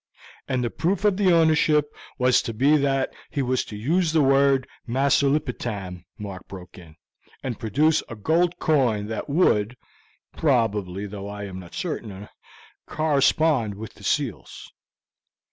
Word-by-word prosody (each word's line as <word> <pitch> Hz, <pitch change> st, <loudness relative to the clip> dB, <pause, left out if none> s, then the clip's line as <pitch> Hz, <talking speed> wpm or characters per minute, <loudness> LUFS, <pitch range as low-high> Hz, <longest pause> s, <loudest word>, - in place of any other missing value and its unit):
"And 130 Hz, -2 st, -1 dB
that 120 Hz, -, 0 dB
the -, -, -18 dB
proof 190 Hz, +4 st, +1 dB
of 205 Hz, -2 st, +2 dB
his 190 Hz, -3 st, +4 dB
ownership 155 Hz, -2 st, +3 dB, 0.2 s
was 125 Hz, -1 st, +3 dB
to 115 Hz, -3 st, -5 dB
be 140 Hz, +6 st, +4 dB
that 135 Hz, -2 st, 0 dB, 0.2 s
he 145 Hz, -4 st, -2 dB
was 130 Hz, 0 st, 0 dB
to 105 Hz, -, -9 dB
use 160 Hz, -, +1 dB
the 155 Hz, -2 st, +4 dB
word 135 Hz, -1 st, +3 dB, 0.2 s
'Masulipatam,'" 125 Hz, -, 0 dB
Mark 100 Hz, -3 st, -8 dB
broke 95 Hz, -1 st, -11 dB
in, 80 Hz, -3 st, -15 dB, 0.5 s
"and 125 Hz, -5 st, -4 dB
produce 145 Hz, +9 st, +2 dB
a 115 Hz, -, -6 dB
gold 170 Hz, -, +1 dB
coin 125 Hz, -9 st, +1 dB
that 110 Hz, +6 st, -5 dB
would, 125 Hz, -, +2 dB, 0.6 s
probably 105 Hz, -, 0 dB
though 100 Hz, 0 st, -7 dB
of -, -, -6 dB
this 105 Hz, -, -6 dB
I -, -, -5 dB
am 95 Hz, -1 st, -8 dB
not 90 Hz, -2 st, -12 dB
certain 105 Hz, -, -5 dB, 0.6 s
correspond 145 Hz, -6 st, +2 dB
with 110 Hz, +2 st, -9 dB
the -, -, -17 dB
seals." 135 Hz, -, -3 dB
130 Hz, 155 wpm, -24 LUFS, 105-150 Hz, 0.6 s, his